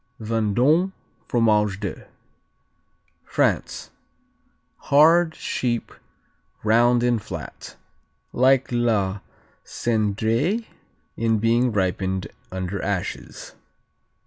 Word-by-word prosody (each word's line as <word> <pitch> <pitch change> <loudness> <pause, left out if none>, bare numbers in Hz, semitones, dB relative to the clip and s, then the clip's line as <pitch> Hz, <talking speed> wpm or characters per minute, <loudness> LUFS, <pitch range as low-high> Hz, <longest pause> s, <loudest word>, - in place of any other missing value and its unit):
Vendôme, 120 - +1 0.3
Fromage 105 -4 +2
de 100 -3 -6 1.2
France - - -1 1.0
Hard; 160 +3 +5
sheep; 120 -2 -2 0.7
round 120 +2 +4
and 120 -3 +1
flat; - - -8 0.6
like 130 +1 +3
la 110 -5 +1 0.4
Cendrée 115 - 0 0.5
in 115 -1 +1
being 115 +3 +2
ripened 95 -1 -1 0.2
under 95 +1 -4
ashes. 95 -2 -4
115 Hz, 70 wpm, -23 LUFS, 105-125 Hz, 1.2 s, Hard